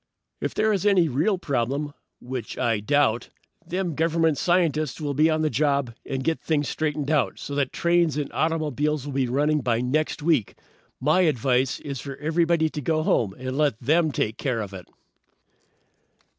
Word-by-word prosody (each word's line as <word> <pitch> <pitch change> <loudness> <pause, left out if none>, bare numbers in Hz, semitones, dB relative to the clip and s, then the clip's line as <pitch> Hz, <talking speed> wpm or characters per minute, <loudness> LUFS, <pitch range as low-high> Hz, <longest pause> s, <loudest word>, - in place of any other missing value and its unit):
"If - - -3
there 220 0 +2
is 195 - -1
any 195 -5 +4
real 160 - +1
problem, 140 -1 -2 0.3
which 125 -3 -6
I 115 -3 +1
doubt, 125 0 +1 0.3
them 175 0 -2
Government 160 0 +2
scientists 155 -5 +1
will 145 -2 -2
be 155 +4 +4
on 155 0 +1
the 155 - +2
job 140 -1 +1
and 135 -1 -4
get 160 +4 -1
things 150 -3 0
straightened 150 -2 -2
out 150 -3 +1
so 145 - -6
that 140 -2 0
trains 170 -3 +2
and 150 - -3
automobiles 150 -3 0
will 145 - -5
be 135 -1 +1
running 150 +4 +1
by 120 -2 +1
next 145 +5 -1
week. 150 -10 +1 0.4
My 155 +7 +3
advice 130 -4 +1
is 140 -3 -5
for 140 -1 -6
everybody 160 +2 +1
to 150 -1 -5
go 155 +3 0
home 100 -10 +1
and 130 +1 -4
let 145 -6 +1
them 155 +5 +2
take 110 -2 -2
care 125 -6 -1
of 100 -2 -6
it." 90 -2 -9
150 Hz, 175 wpm, -25 LUFS, 130-160 Hz, 0.4 s, any